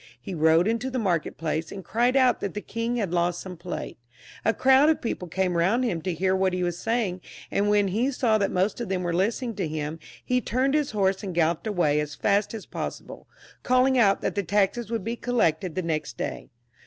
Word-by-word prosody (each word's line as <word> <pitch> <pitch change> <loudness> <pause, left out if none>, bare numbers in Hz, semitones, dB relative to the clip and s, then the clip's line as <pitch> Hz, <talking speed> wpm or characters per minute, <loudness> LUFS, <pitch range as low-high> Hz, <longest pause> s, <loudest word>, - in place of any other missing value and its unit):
He 185 - -7
rode 160 +2 +4
into 230 +3 -1
the 260 - -3
market 180 -9 -1
place, 160 0 -2
and 195 -2 -8
cried 240 +3 +1
out 255 -2 +4
that 200 - -4
the - - -1
king 230 +3 -3
had 200 -7 -2
lost 175 0 +1
some 185 -1 -7
plate; 175 -6 -6 0.4
a 225 - +3
crowd 265 +5 +5
of 320 - +2
people 185 -6 -4
came 180 +1 -1
round 190 +9 +2
him 185 -10 -1
to 180 +2 -2
hear 190 +3 +1
what 190 -1 +1
he 180 0 -1
was 175 -1 -2
saying, 225 -6 -1 0.3
and 205 +1 +1
when 205 -1 +3
he 230 +8 +1
saw 235 -5 +1
that 200 - +1
most 190 +5 0
of 235 - -4
them 185 -1 -1
were 175 -1 -1
listening 225 +6 0
to 190 -5 -1
him, 155 +1 -4 0.3
he 250 0 +1
turned 260 +4 0
his 300 -2 +1
horse 195 -3 +1
and 190 -5 -5
gal 165 -2 +4
loped 170 +6 -4
away 170 -8 +2
as 150 0 -3
fast 205 +1 +1
as 215 - -7
possible, - - -7 0.3
calling 255 +1 +3
out 205 -6 +4
that - - -1
the 200 - 0
taxes 205 +4 0
would 230 -4 -2
be 230 +3 -2
collected 185 -9 0
the 185 - -1
next 155 -7 -3
day. - - -5
195 Hz, 230 wpm, -26 LUFS, 175-235 Hz, 0.4 s, crowd